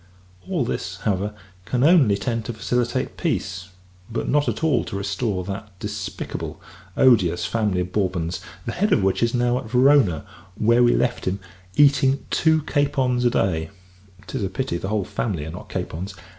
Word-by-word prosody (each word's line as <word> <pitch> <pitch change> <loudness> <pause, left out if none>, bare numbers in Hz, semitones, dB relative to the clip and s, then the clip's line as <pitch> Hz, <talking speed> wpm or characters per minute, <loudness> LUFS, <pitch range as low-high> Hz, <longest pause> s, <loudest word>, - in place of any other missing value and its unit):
All 170 -10 0
this, 90 -4 -3
however, 105 0 -1 0.3
can 125 +4 0
only 145 - +5
tend 115 +3 -2
to 120 - -4
facilitate 120 +3 -1
peace, 95 +1 -2 0.4
but 115 - -2
not 145 0 +2
at - - -4
all 160 -2 +3
to - - -6
restore 100 0 -2
that 100 0 -7
despicable, 105 -1 -5 0.4
odious 90 -9 +4
family 105 -2 0
of 90 +1 -4
Bourbons 90 -4 -1 0.2
the - - -2
head 205 +3 0
of 100 - +3
which 95 0 +1
is 115 +1 +2
now 120 0 +2
at 120 - -9
Verona, 125 - +4 0.3
where 115 +3 +3
we 120 0 +5
left 125 - 0
him 95 +2 -1 0.4
eating 140 0 +4
two 160 -2 +3
capons 135 -4 +1
a - - +6
day; 80 -8 0 0.6
('tis - - -4
a 95 - -1
pity 130 -3 -2
the 95 - -4
whole 105 -3 0
family 90 -10 -3
are 80 - -6
not 85 - -9
capons!) 95 +4 -4
110 Hz, 170 wpm, -23 LUFS, 95-125 Hz, 0.6 s, a